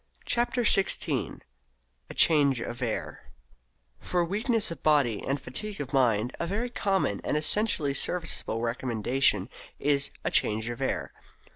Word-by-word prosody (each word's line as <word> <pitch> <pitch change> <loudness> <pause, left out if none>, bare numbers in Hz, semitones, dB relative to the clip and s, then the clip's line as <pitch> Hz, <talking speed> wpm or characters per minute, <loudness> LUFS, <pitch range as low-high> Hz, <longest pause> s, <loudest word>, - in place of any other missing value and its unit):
CHAPTER 240 +1 0
XVI 195 -3 +1 0.7
A - - -7
CHANGE 140 -5 +5
OF 120 +1 -6
AIR 110 - -4 0.7
For 175 -1 -1
weakness 220 +3 0
of 165 - -8
body 140 -8 +2
and 140 +1 -1
fatigue 195 +11 -6
of 145 -1 -6
mind 120 -3 +2
a 170 - -2
very 225 +7 -2
common 195 - 0
and - - 0
essentially 155 -3 +1
serviceable 165 -8 -1
recommendation 120 -3 +1 0.3
is 140 -1 +1
"a - - -1
change 110 +1 +2
of 120 +2 -6
air." 135 - -2
140 Hz, 135 wpm, -27 LUFS, 120-190 Hz, 0.7 s, CHANGE